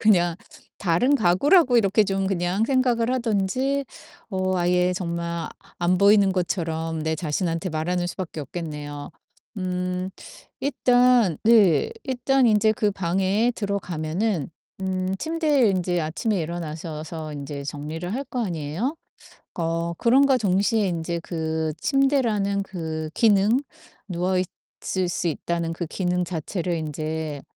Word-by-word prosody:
그냥 175 -6 +3 0.4
다른 205 +10 +2
가구라고 255 - +4
이렇게 205 0 +3
좀 195 -1 -1
그냥 190 +2 0
생각을 250 -3 +2
하든지 255 +5 0 0.5
어 185 -1 0
아예 180 +1 +2
정말 170 -2 -3
아 170 0 -3 0.3
안 175 +1 +2
보이는 200 -1 +5
것처럼 165 -3 -2
내 160 0 0
자신한테 165 +3 -2
말하는 175 +3 -1
수밖에 175 -3 -5
없겠네요. 145 -1 -6 0.5
음 180 0 -2 0.5
일단 245 - +3
네 220 - +5 0.2
일단 265 0 +1
인제 215 -1 +4
그 215 -3 +1
방에 195 +5 +1
들어가면은 185 - -2 0.3
음 185 0 -1
침대에 305 - +2
인제 180 -2 0
아침에 175 +5 -1
일어나셔서 160 -1 -5
인제 140 0 -6
정리를 155 +5 -5
할 270 +4 -2
거 250 -3 -3
아니에요? 175 - -3 0.6
어 165 0 -1
그럼과 265 +3 +5
동시에 200 +1 +2
인제 170 0 -2
그 160 -2 -2
침대라는 235 -8 +2
그 160 -4 -4
기능 215 +2 +4 0.5
누워 180 +1 0 0.5
있을 185 -2 -1
수 175 0 -1
있다는 165 +1 -2
그 170 0 -4
기능 180 +1 -1
자체를 175 +1 -3
인제 155 -1 -4
180 Hz, 265 characters per minute, -24 LUFS, 165-215 Hz, 0.6 s, 보이는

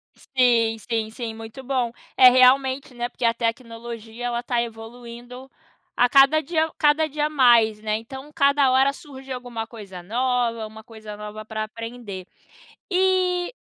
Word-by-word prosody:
Sim, 235 -4 +1
sim, 220 0 -3
sim, 225 0 -6
muito 225 +4 -10
bom. 255 -3 -1 0.3
É 255 - +9
realmente, 260 +1 +3
né, 240 0 -3
porque 245 - -10
a 230 - +3
tecnologia, 230 0 -5
ela 240 -1 -2
está 240 -1 -1
evoluindo 240 +3 -9 0.5
a 245 0 +3
cada 275 +3 +5
dia 315 +1 0
a 320 - -9
cada 300 +1 +3
dia 300 0 -2
mais, 235 -7 +4
né. 215 0 -1
Então 265 +6 -10
cada 280 -2 +3
hora 265 +2 +4
surge 275 -4 -12
alguma 245 -3 -5
coisa 200 -6 -11
nova, 235 0 -1
uma 220 0 -13
coisa 220 -2 -10
nova 210 +1 -8
para 220 -1 -4
aprender. 230 -4 -8 0.7
E 365 0 +1
245 Hz, 155 wpm, -23 LUFS, 225-270 Hz, 0.7 s, É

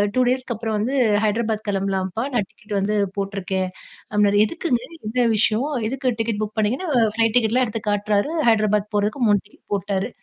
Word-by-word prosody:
2 255 - +4
டேஸ்க்கு 255 -1 0
அப்புறம் 220 0 -3
வந்து 235 +6 -1 0.3
ஹைதராபாத் 220 0 0
கிளம்பலாம்ப்பா. 195 +2 -1
நான் 215 -5 +1
டிக்கெட் 215 -2 -10
வந்து 210 +2 0 0.2
போட்டுருக்கேன்." 195 -1 -2 0.4
அப்பிடீன்னாரு. 205 -1 +3
"எதுக்குங்க? 300 -2 -1 0.3
என்ன 245 +1 +1
விஷயம்?" 220 +6 +2 0.2
எதுக்கு 255 0 -1
டிக்கெட் 225 -2 -1
புக் 215 +1 -6
பண்ணீங்கன்னு 250 - 0 0.3
ஃப்ளைட் 225 0 +2
டிக்கெட்லாம் 245 +2 +2
எடுத்து 220 0 -4
காட்டுறாரு. 205 +6 +1 0.2
ஹைதராபாத் 210 -1 +2
போறதுக்கு 210 +6 0
3 205 -2 +4
டிக்கெட் 210 - -24
போட்டுடாரு. 195 +2 -1
215 Hz, 160 wpm, -22 LUFS, 205-235 Hz, 0.4 s, 2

